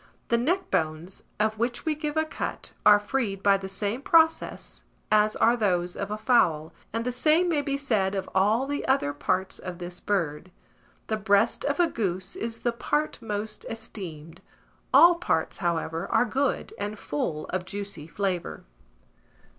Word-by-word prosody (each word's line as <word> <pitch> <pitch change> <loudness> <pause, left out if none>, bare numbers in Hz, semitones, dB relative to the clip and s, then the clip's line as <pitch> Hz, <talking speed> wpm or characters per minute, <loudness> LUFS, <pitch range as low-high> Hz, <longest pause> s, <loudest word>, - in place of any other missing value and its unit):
The 235 - +3
neck 360 +9 0
bones, 165 +1 -1
of 215 0 +1
which 240 +1 -1
we 315 - +2
give 300 0 -4
a 315 - +3
cut, 315 - -5 0.2
are 205 0 +8
freed 205 -3 -2
by 200 -1 +5
the 190 0 -7
same 205 +5 -2
process 320 +1 +2 0.3
as 215 0 +4
are 235 +1 +4
those 180 -6 0
of 200 0 -4
a 210 - -3
fowl; 170 -9 +2 0.2
and 230 +1 -2
the 250 - 0
same 310 +8 +3
may 315 -4 +2
be 275 -1 -2
said 210 -8 0
of 195 - -3
all 210 +7 +3
the 285 +1 -3
other 265 - +2
parts 185 +6 -1
of 180 -1 -6
this 175 0 -6
bird. 175 -4 -2 0.6
The 220 - -1
breast 205 +1 +2
of 285 +2 0
a 350 - +6
goose 190 - -3
is 230 0 -4
the 240 - +1
part 295 +5 -1
most 215 0 -4
esteemed; 185 -9 -8 0.5
all 345 +1 +8
parts, 345 +1 -1
however, 165 -2 -2
are - - +3
good, 265 +4 -1
and 205 +1 -3
full 150 -3 -3
of 185 -1 -2
juicy 200 -5 -6
flavour. 185 -1 -3
210 Hz, 170 wpm, -27 LUFS, 185-250 Hz, 0.6 s, are